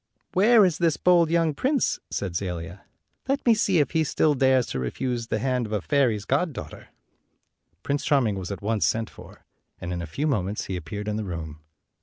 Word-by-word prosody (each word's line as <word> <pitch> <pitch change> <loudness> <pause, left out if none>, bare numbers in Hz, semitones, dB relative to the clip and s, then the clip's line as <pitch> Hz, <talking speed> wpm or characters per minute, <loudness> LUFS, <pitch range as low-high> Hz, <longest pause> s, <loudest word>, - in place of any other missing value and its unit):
"Where 210 +2 +6
is 175 -4 0
this 165 -3 +2
bold 175 -2 +4
young 165 -2 +2
prince?" 270 - 0
said 95 -4 -4
Zelia. 90 0 -5 0.4
"Let 275 +1 -1
me 235 - +6
see 200 -4 +2
if 145 -4 +2
he 160 -1 +2
still 150 0 +2
dares 130 -2 +3
to 65 - -2
refuse 120 - -3
the - - -1
hand 125 -3 -1
of - - -11
a 105 - 0
fairy's 115 -3 +1
goddaughter." 140 - -2 1.0
Prince 140 0 -1
Charming 120 -9 +2
was 90 - -6
at 100 - -6
once 105 -6 +1
sent 110 +7 -1
for, - - -15 0.3
and 90 +1 -5
in 85 - -3
a 85 - -5
few 110 - -3
moments 105 -8 -1
he 95 - -4
appeared 100 +5 -6
in 105 0 -1
the 110 - -2
room. 80 -5 -6
120 Hz, 200 wpm, -25 LUFS, 95-155 Hz, 1.0 s, Where